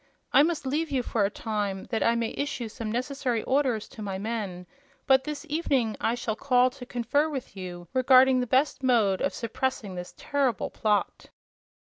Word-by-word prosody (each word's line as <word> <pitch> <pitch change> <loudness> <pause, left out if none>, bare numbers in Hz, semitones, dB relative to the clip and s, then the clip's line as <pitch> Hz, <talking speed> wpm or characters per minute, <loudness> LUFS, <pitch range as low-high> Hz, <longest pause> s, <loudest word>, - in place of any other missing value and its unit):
I - - +8
must 310 -2 0
leave 300 +4 -1
you 265 -3 0
for 220 -3 +1
a - - +1
time, 205 -3 -3
that 225 - 0
I 230 - +3
may 230 -1 -1
issue 280 -5 -3
some 225 -1 -5
necessary 250 -1 -1
orders 260 -5 +1
to 220 - -11
my 195 -2 -3
men; 200 -4 -4 0.4
but 265 0 +4
this 300 +1 -5
evening 275 -8 0
I 230 - +1
shall 235 -3 -3
call 255 0 +3
to 250 -1 -11
confer 250 +6 0
with 270 -8 -6
you 175 -2 -7
regarding 260 0 +6
the 250 - -1
best 265 +2 +2
mode 225 -7 +3
of 280 - +1
suppressing 230 -3 -3
this 180 0 -7
terrible 270 -7 -1
plot." 210 -2 0
245 Hz, 180 wpm, -27 LUFS, 215-270 Hz, 0.4 s, I